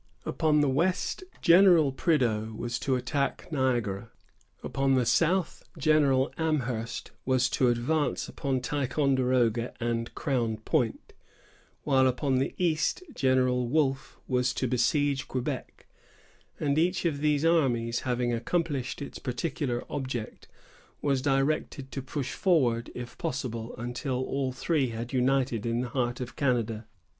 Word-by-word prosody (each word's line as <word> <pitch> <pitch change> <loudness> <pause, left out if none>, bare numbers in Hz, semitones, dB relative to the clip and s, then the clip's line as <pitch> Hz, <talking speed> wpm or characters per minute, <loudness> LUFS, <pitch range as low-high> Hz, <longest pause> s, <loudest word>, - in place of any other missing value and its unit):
Upon 150 -1 +2
the 145 - +3
west, 175 - 0 0.2
General 170 -4 +6
Prideaux 115 -8 0
was 120 +1 -3
to 135 - 0
attack 140 +4 -2
Niagara; 120 -7 0 0.5
upon 135 0 +1
the 125 -2 +2
south, 165 +9 +1 0.2
General 145 -3 +3
Amherst 125 -8 -2
was 130 -1 +2
to 130 - +2
advance 130 +6 0
upon 135 -4 -2
Ticonderoga 130 -3 +1
and 115 -1 -2
Crown 120 -7 -1
Point; 115 +1 -1 0.7
while 130 -2 +4
upon 130 +1 +1
the 135 - -1
east, 170 - 0
General 130 -2 +2
Wolfe 135 0 0
was 125 -1 +1
to 130 - 0
besiege 135 +3 +1
Quebec; 130 -2 -4 0.7
and 145 0 +1
each 180 +2 +1
of 150 -4 0
these 150 0 +1
armies, 120 -8 +2
having 125 -1 -1
accomplished 140 +2 -2
its - - -8
particular 125 -1 -2
object, 130 -6 -5 0.6
was 140 -3 +1
directed 135 0 0
to 135 - -4
push 130 0 -4
forward, 125 -11 +2
if 120 0 -8
possible, 115 -3 -4
until 120 +3 -3
all 135 0 -1
three 135 +2 0
had 115 +2 -6
united 130 -3 +1
in 115 +1 0
the 125 - -4
heart 120 -1 -1
of 125 -1 -6
Canada. 115 -5 0
130 Hz, 130 wpm, -28 LUFS, 120-145 Hz, 0.7 s, General